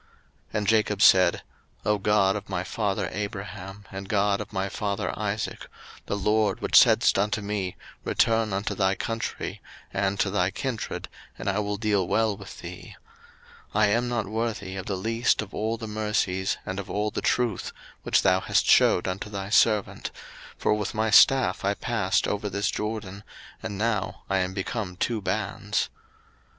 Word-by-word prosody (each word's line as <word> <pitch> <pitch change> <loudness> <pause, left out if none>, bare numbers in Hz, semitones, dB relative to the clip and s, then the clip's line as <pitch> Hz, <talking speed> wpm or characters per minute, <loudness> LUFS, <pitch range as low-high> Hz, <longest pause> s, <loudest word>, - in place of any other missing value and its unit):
01:032:009 - - -32 0.5
And 105 -1 -1
Jacob 105 -2 +2
said, 90 -2 +6 0.4
O 105 -1 +2
God 100 -1 +3
of 105 -1 -6
my 90 -2 -2
father 100 0 -1
Abraham, 100 -1 -6
and 95 0 -7
God 100 -1 +2
of - - -8
my 95 +1 -1
father 100 0 -2
Isaac, - - -3 0.4
the 100 - -1
LORD 105 0 +1
which - - -1
saidst - - +5
unto 105 +2 +1
me, 100 -3 -3 0.3
Return 115 -2 +2
unto 100 +2 -1
thy 95 -1 +1
country, 115 +3 -4 0.3
and 100 0 0
to 95 - +1
thy 95 -2 +2
kindred, 115 +2 -4 0.3
and - - -6
I 100 +1 +1
will 105 0 -2
deal 100 -4 +1
well 110 0 +2
with 100 -1 -11
thee: 90 +1 -9 0.8
01:032:010 - - +3
I 110 - +6
am 120 +3 +1
not 120 -3 -1
worthy 105 -2 -3
of 95 -1 -6
the 100 - -1
least 115 +3 +1
of 105 - -13
all 110 +2 -1
the 115 - -6
mercies, 105 -3 -1
and 95 +1 -4
of 100 - -7
all 105 +1 -1
the - - -3
truth, 120 -6 0 0.3
which - - +2
thou 95 -1 +4
hast - - +1
shewed 90 - +5
unto 95 +3 -4
thy 100 -1 -5
servant; 105 -2 +2 0.5
for - - +2
with 105 +1 -2
my 110 0 +1
staff 135 +2 +5
I 100 +1 +1
passed 105 -6 0
over 105 0 -2
this 100 +1 0
Jordan; 105 -2 -4 0.4
and 100 - -5
now 105 -3 -1
I 95 - +3
am 90 0 -2
become 95 -1 -3
two 110 +4 -1
bands. - - -1
105 Hz, 175 wpm, -26 LUFS, 95-110 Hz, 0.8 s, said